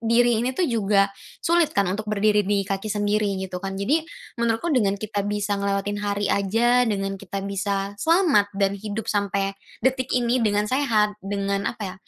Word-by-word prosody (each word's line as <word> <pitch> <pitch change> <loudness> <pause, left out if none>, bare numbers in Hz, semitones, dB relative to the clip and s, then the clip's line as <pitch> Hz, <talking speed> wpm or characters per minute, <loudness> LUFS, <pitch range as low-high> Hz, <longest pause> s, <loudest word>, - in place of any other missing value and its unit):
diri 235 0 +3
ini 255 +2 -2
tuh 360 - +2
juga 200 -5 +2 0.3
sulit 340 -6 +2
kan 200 - +4
untuk 205 +4 -3
berdiri 210 0 +3
di 200 0 0
kaki 195 +1 -3
sendiri, 205 -1 0
gitu 185 -1 -5
kan? 195 0 -4
Jadi 265 +12 +1 0.4
menurutku 235 +8 0
dengan 200 -7 +2
kita 205 0 -3
bisa 205 -1 -1
ngelewatin 200 +1 -1
hari 205 0 -1
aja, 230 +5 +2
dengan 195 -2 -2
kita 195 0 -5
bisa 200 0 -2
selamat 325 - +3
dan 195 -1 +2
hidup 215 0 -4
sampai 200 -1 0 0.3
detik 260 -1 +1
ini 245 +1 +1
dengan 210 -1 +2
sehat, 215 -5 +1
dengan 200 0 -2
apa 230 - -6
ya? 185 -1 -5
205 Hz, 175 wpm, -24 LUFS, 200-230 Hz, 0.4 s, kan